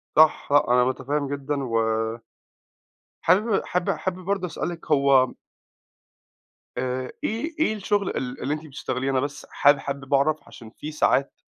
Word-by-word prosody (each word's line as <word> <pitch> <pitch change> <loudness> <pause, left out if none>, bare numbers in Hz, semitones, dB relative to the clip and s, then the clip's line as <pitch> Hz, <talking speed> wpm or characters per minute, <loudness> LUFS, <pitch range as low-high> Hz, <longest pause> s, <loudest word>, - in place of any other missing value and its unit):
صح، 155 0 +5
أنا 125 -4 +5
مُتفهِّم 140 +3 -1
جدًا 140 0 -3
و 115 -3 0 1.4
حابب 205 +2 +3
حاب 180 +2 -1
حابب 185 +1 -2
برضه 195 -1 -1
أسألِك 170 -1 -5
هو 135 -3 +4 1.4
آآ 130 0 -2
إيه 295 +9 -2
إيه 265 -8 +2
الشُغل 205 -1 0
ال 125 0 -4
اللي 140 +4 -1
أنتِ 155 +1 -5
بتشتغليه؟ 130 -2 -3
أنا 130 - +2
بس 145 +2 -4
حاب 145 0 +5
حابب 140 -1 -5
أعرف 145 +2 +2
عشان 115 - -12
في 150 +5 -7
ساعات 140 -2 +2
145 Hz, 140 wpm, -24 LUFS, 135-175 Hz, 1.4 s, صح